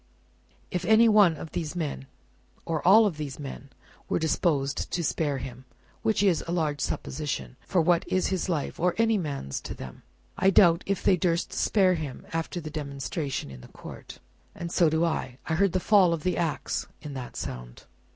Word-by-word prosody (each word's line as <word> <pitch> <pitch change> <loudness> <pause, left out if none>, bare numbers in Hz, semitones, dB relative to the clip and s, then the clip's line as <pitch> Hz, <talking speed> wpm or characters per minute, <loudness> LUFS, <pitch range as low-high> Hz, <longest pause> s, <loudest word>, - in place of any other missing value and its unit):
"If 180 -1 -2
any 220 +3 +6
one 205 -7 +5
of 160 - -8
these 160 -1 -4
men, 145 -5 -4 0.6
or 160 -2 -1
all 215 +4 +8
of 185 -7 -1
these 145 -3 -5
men, 140 -1 -8 0.4
were - - +1
disposed 150 -3 0
to 175 - -1
spare 145 -2 0
him 130 0 -8 0.4
which 220 -2 +1
is 185 -5 +3
a - - -3
large 155 -4 -1
supposition; 130 - -3
for 185 - +2
what 170 +1 +3
is 185 - +1
his 190 0 -1
life, 155 -5 -2
or 180 +1 +1
any 225 -2 +3
man's 140 - -4
to - - -7
them! 65 -2 -9 0.4
I 190 - +5
doubt 175 -3 +5
if 195 -1 -1
they 185 - +4
durst 170 0 0
spare 190 -3 +3
him 155 -6 -5
after 165 +2 -2
the 155 -2 -7
demonstration 140 - -4
in 65 -2 -10
the - - -12
court." - - -11 0.4
"And 170 -1 -6
so 170 -3 +4
do 160 +2 +2
I. 130 -6 -2
I 160 - -2
heard 195 +2 +2
the 185 - +2
fall 185 -3 +5
of 165 - -4
the 180 0 +1
axe 165 -3 -2 0.2
in 150 -2 -6
that 130 -3 -7
sound." - - -7
165 Hz, 190 wpm, -27 LUFS, 140-180 Hz, 0.6 s, all